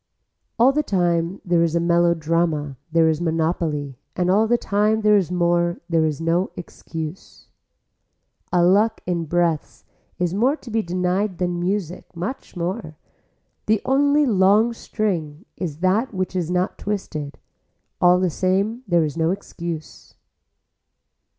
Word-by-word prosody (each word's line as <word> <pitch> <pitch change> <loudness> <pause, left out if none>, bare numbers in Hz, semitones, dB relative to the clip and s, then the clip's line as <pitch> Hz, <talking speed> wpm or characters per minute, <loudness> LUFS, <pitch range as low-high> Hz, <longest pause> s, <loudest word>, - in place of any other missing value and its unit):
All 245 +3 +6
the 300 +2 +1
time 175 - 0
there 175 -2 +2
is 170 -1 +1
a - - +3
melodrama 165 -3 +1 0.2
there 165 0 +4
is 160 0 0
monopoly 160 -5 -1 0.2
and 180 0 +1
all 215 +3 +3
the 240 +2 +3
time 215 +1 +1
there 210 0 +5
is 185 -4 +1
more 175 -1 +1
there 165 -2 +2
is 150 -2 -3
no 170 +3 +1
excuse. 160 -1 -8 1.0
A 180 -1 +3
luck 210 +5 +3
in 170 -2 -1
breaths 160 -7 -1 0.3
is 175 -1 -1
more 245 +9 +2
to 250 -6 -12
be 225 +1 +1
denied 180 +1 -1
than 175 -1 -1
music, 180 -1 -3
much 185 +11 -6
more. 170 -2 -4 0.7
The 215 0 +3
only 285 +2 +3
long 210 +1 +4
string 180 -8 -3
is 165 -4 -5
that 205 +5 +1
which 185 0 -2
is 175 -3 -1
not 180 +1 -1
twisted. 155 -8 -4 0.6
All 180 0 +5
the 185 -2 +1
same 195 +8 0
there 170 -3 +3
is 150 -1 -3
no 165 0 +1
excuse. 170 -4 -6
180 Hz, 145 wpm, -22 LUFS, 165-205 Hz, 1.0 s, All